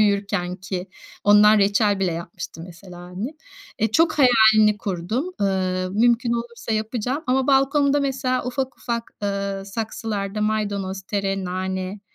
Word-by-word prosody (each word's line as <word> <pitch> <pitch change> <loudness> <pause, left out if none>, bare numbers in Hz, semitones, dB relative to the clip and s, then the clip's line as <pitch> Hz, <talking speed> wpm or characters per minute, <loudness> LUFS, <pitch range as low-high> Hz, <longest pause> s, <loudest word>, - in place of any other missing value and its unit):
büyürkenki, 190 -3 -1 0.4
ondan 210 +1 +6
reçel 205 0 +2
bile 185 -3 +1
yapmıştı 165 0 -7
mesela 180 0 -12
annem. 185 - -6 0.4
Eee, 220 - +1
çok 320 +8 +3
hayalini 220 -4 +5
kurdum, 205 - -3
ııı, 185 -2 0
mümkün 235 +3 +2
olursa 235 -1 -4
yapacağım 240 +7 -2
ama 260 +1 +1
balkonda 280 +1 +3
mesela 260 -2 -1
ufak 260 +1 -3
ufak, 235 -1 -4
ııı, 200 -1 -2
saksılarda 210 -1 -4
maydanoz, 200 -3 -1
tere, 195 -1 -2
nane, 185 +2 -4
210 Hz, 125 wpm, -22 LUFS, 190-235 Hz, 0.4 s, ondan